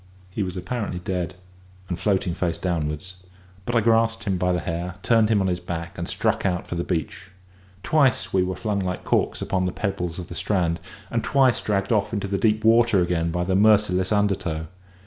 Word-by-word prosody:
He 105 - -3
was 95 -1 -3
apparently 100 0 -3
dead, 90 0 -3 0.5
and 90 -1 -4
floating 95 -4 +1
face 85 -2 -1
downwards; 85 +1 -3 0.5
but 120 - -1
I 115 - +5
grasped 115 0 +2
him 100 -3 0
by 90 0 +2
the 90 - +1
hair, 85 +2 -4
turned 115 -2 +4
him 105 -3 +3
on 95 - +1
his 90 -1 0
back, 85 -1 -5
and 85 - -4
struck - - 0
out 90 -1 0
for - - -6
the 85 0 -1
beach. 95 +2 -3 0.6
Twice 140 -6 +2
were 95 - +3
we 90 0 -2
flung 105 +1 -2
like 90 -1 -3
corks - - 0
upon 95 -1 0
the - - -1
pebbles 90 -6 -3
of 90 -2 -6
the - - -8
strand, 85 -5 0 0.3
and 115 -1 0
twice 130 +1 +3
dragged 100 -1 -1
off 110 0 +1
into 100 -2 -2
deep 110 +2 +2
water 115 -2 +5
again 85 -1 0
by 90 +1 -1
the 95 +1 0
merciless 100 -2 +3
undertow. 95 -6 0
95 Hz, 200 wpm, -24 LUFS, 90-105 Hz, 0.6 s, I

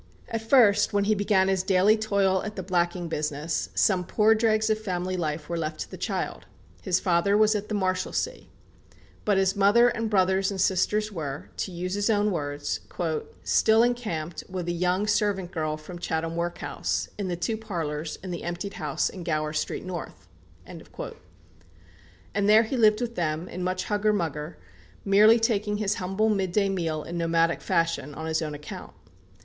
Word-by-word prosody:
At 225 -1 -2
first, 225 -4 +4
when 200 0 +2
he 215 +2 +3
began 200 -2 +2
his 190 -1 +2
daily 190 +2 +4
toil 200 -3 +1
at 210 0 -5
the 190 - -4
blacking 175 -1 0
business, 150 0 -2
some 185 -3 +3
poor 215 +4 +3
dregs 220 -1 +2
of 215 - +1
family 185 -3 -2
life 155 -3 -3
were 170 0 -2
left 155 -1 -3
to - - -6
the - - -6
child. - - -4 0.3
His 185 -2 +1
father 190 +2 +2
was 215 0 +4
at 210 0 -3
the 215 - -1
Marshalsea. 185 - -2 0.8
But 205 -2 +3
his 190 0 +2
mother 205 +5 +5
and 230 -2 -2
brothers 190 -1 +2
and 195 -2 -4
sisters 210 +3 +1
were, 150 -6 -6
to 190 - -3
use 180 +1 -4
his 205 +2 0
own 210 -1 +2
words, 145 -4 -3 0.6
"still 220 +1 +4
encamped, 210 -10 -2
with 185 -2 -4
a - - 0
young 180 +3 0
servant 205 -4 0
girl 155 -3 -2
from 170 +3 -10
Chatham 165 -1 -2
workhouse, 170 +1 -2
in 200 - -2
the 175 - -1
two 175 +6 -2
parlours 165 -8 -4
in 185 - -5
the 170 - -4
emptied 175 +4 -4
house 150 -3 0
in 185 - -7
Gower 155 -2 -1
Street 155 - -3
North." 175 - -7 0.4
And - - -10 1.7
there 215 +2 +7
he 230 +4 -3
lived 215 -2 +4
with 235 -1 -2
them, 165 -2 -2
in 180 - -6
much 185 0 -1
"hugger 210 0 +1
mugger," 160 -4 -3 0.5
merely 210 +3 +6
taking 210 -2 0
his 210 -1 0
humble 195 +4 +1
midday 195 -1 +1
meal 165 -5 -2
in 170 0 -5
nomadic 165 0 +1
fashion, 165 -4 0
on 160 - -6
his 160 0 0
own 150 -2 -3
account. 145 - -9
185 Hz, 175 wpm, -26 LUFS, 170-210 Hz, 1.7 s, there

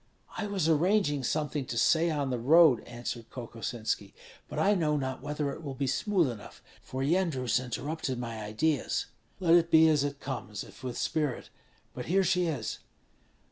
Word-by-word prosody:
"I 210 - -3
was 195 -6 0
arranging 165 -3 +2
something 150 -1 -1
to 120 - -4
say 165 +7 +4
on 145 -4 -1
the 125 - -1
road," 150 +1 +6
answered 120 -1 -6
Kokosinski, 115 -4 -4 0.3
"but - - -6
I 205 - +4
know 155 -6 +1
not 130 -2 -3
whether 145 0 -2
it - - -9
will 140 -4 -6
be 140 - -1
smooth 175 - +1
enough, 105 -3 -11 0.2
for 130 +1 -4
Yendrus 150 -7 +1
interrupted 135 +2 -3
my 115 -3 -5
ideas." 125 +7 0 0.3
"Let 170 -3 +3
it 170 -1 +5
be 160 0 +7
as 150 -3 +3
it 145 0 -3
comes, 120 -7 -5
if - - -15
with 125 -2 -4
spirit. 150 -6 -2 0.4
But 125 - -6
here 190 +3 +3
she 180 -1 +2
is!" 140 -9 -3
145 Hz, 175 wpm, -29 LUFS, 125-165 Hz, 0.4 s, be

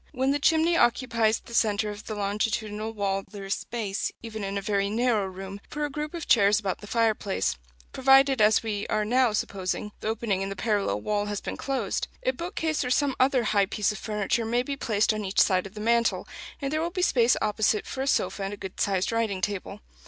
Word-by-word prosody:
When 265 0 +1
the 290 - +1
chimney 320 +3 +3
occupies 230 -4 +2
the 235 - -13
centre 210 -2 +2
of 205 +1 -10
the 215 - -4
longitudinal 210 +1 -2
wall 200 -2 -1
there 200 -2 -8
is 195 - 0
space, 210 -4 -3
even 220 -2 -6
in 195 0 -3
a - - +1
very 200 0 0
narrow 220 -2 +1
room, 190 +1 -8
for 300 0 -2
a 290 - -5
group 300 +3 -4
of 335 - -6
chairs 205 -2 +5
about 195 -4 -3
the 205 - -11
fireplace 210 - 0 0.4
provided, 270 -1 +5
as 215 +1 +5
we 210 -2 -3
are 215 0 0
now 250 +1 +3
supposing, 200 0 -2
the - - -5
opening 220 -3 -1
in 195 - -2
the 195 - -5
parallel 210 -2 0
wall 210 -1 -1
has 205 -1 -2
been - - -5
closed. 260 -8 -2 0.2
A 255 - +2
bookcase 320 +1 -2
or 250 - -2
some 275 +1 +2
other 260 -1 +3
high 200 -3 +2
piece 210 0 0
of 210 - -7
furniture 210 +2 -1
may 240 +2 0
be 280 +2 -3
placed 215 -5 +1
on 215 -1 -3
each 190 0 -1
side 185 0 +3
of 195 - -17
the - - -7
mantel, 235 +1 +1 0.3
and 275 0 -3
there 310 - +1
will 335 - -1
be 365 +1 -2
space 245 -6 +4
opposite 215 0 +1
for 265 - -5
a 270 - -2
sofa 210 - 0
and 195 +1 -3
a - - -20
good 190 -1 -7
sized 190 0 +1
writing 225 -4 0
table. 200 +1 -3
215 Hz, 225 wpm, -27 LUFS, 200-250 Hz, 0.4 s, chairs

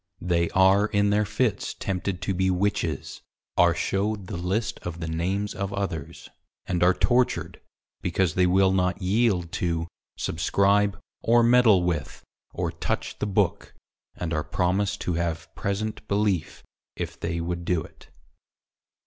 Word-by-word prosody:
They 85 -2 +1
are 95 +2 +4
in 100 -1 +2
their 105 +1 +2
Fits 105 0 -1
tempted 95 -1 -3
to 95 - 0
be 95 +1 +1
Witches, 90 -5 -1 0.3
are 85 -1 +4
shewed 100 +3 -1
the - - -6
List 95 +6 -2
of 85 -1 -6
the 80 - -4
Names 95 +6 -1
of 100 0 -3
others, 100 -7 -4 0.4
and 90 -2 -1
are 90 +1 +5
tortured, 125 +5 +1 0.4
because 90 -2 +1
they 90 -1 +3
will 95 +1 +4
not 90 -1 +1
yeild 95 -3 +1
to 85 -1 0 0.3
Subscribe, 100 +4 +2 0.2
or 120 +1 +4
meddle 115 -6 +5
with, 85 -4 -3 0.3
or - - -2
touch - - -3
the 105 - -1
BOOK, 100 - 0 0.4
and 85 -2 -3
are 75 -1 0
promised 95 +5 0
to 90 - -1
have 85 -1 -3
present 105 +2 -3
Belief 100 -5 0 0.3
if - - -5
they 85 0 -2
would 85 +1 -3
do 85 -2 0
it. - - -16
95 Hz, 150 wpm, -26 LUFS, 85-100 Hz, 0.4 s, are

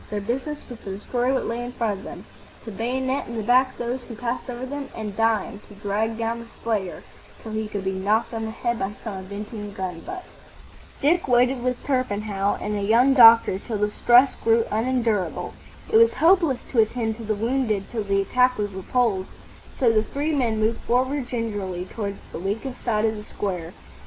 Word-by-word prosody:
Their 210 - -2
business 260 +8 -3
was 240 -2 -9
to 195 -3 -6
destroy 245 +4 -1
what 270 - 0
lay 235 +1 -2
in 245 0 -6
front 220 -5 -1
of - - -12
them, - - -9 0.4
to 225 - -6
bayonet 260 +5 -1
in 235 - -5
the 220 - -2
back 255 +3 +3
those 245 +2 -3
who 230 - -8
passed 245 +3 -4
over 245 +1 -4
them, 280 +1 -5
and, 210 -3 -5
dying, 225 -1 +1
to 205 - -13
drag 210 +2 -1
down 230 0 -2
the 235 - -10
slayer 215 -6 -3 0.4
till 220 - -7
he 220 0 -2
could 205 -2 -4
be 190 - 0
knocked 205 +5 0
on 225 -1 -3
the - - -3
head 235 +1 -2
by 195 +1 -2
some 210 -4 -5
avenging 205 +2 -7
gun 185 -3 -4
butt. 365 - -7 0.8
Dick 335 +5 +3
waited 250 +1 +3
with 250 0 -2
Torpenhow 205 -6 0
and 210 - -2
a 205 - -2
young 235 +6 +4
doctor 230 -6 +8
till 220 +1 -4
the 210 0 0
stress 245 +5 +5
grew 230 0 +4
unendurable. 225 -3 0 0.4
It - - +8
was 460 0 +5
hopeless 330 -6 +3
to 245 - +2
attend 220 0 +1
to 230 - -8
the 215 0 -1
wounded 225 -2 0
till 225 -3 -2
the 195 0 +1
attack 250 +5 +3
was 205 -1 -2
repulsed, 190 0 0 0.4
so 245 -3 +2
the 215 - +4
three 285 +7 -2
moved 225 -4 +1
forward 260 +2 0
gingerly 205 -7 -3
towards 200 0 -5
the - - -6
weakest 220 +8 -4
side 220 -2 +1
of 220 0 +1
the 210 - -7
square. 180 -6 -4
225 Hz, 200 wpm, -24 LUFS, 205-250 Hz, 0.8 s, doctor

